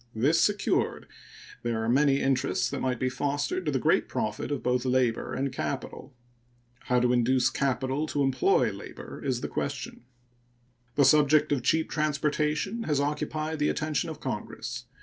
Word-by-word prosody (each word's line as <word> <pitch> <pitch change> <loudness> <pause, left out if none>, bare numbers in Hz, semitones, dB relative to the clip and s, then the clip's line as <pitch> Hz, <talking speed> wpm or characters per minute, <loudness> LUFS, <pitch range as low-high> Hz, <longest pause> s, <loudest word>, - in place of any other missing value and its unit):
This 135 +9 +3
secured, 205 -1 +1 0.6
there 115 -2 -1
are - - -2
many 140 +3 +3
interests 130 -2 +1
that - - -3
might 130 -2 -1
be 130 - 0
fostered 145 - -2
to - - +2
the - - +1
great - - +2
profit - - -2
of 145 -3 -3
both 125 0 +1
labor 125 -3 0
and 135 0 -2
capital. 130 0 -5 0.7
How 125 0 +2
to 125 0 +2
induce 125 +1 +3
capital 135 +3 -1
to 145 -2 0
employ 135 -1 +2
labor - - -9
is - - -1
the - - -2
question. - - -4 0.9
The 140 - +5
subject 150 +2 +5
of 140 -3 +1
cheap 160 +6 +1
transportation 150 +6 0
has 150 -2 +1
occupied 155 +2 -2
the 150 - +2
attention 155 +1 -1
of 155 -1 -7
Congress. 130 -7 -5
140 Hz, 160 wpm, -28 LUFS, 125-150 Hz, 0.9 s, The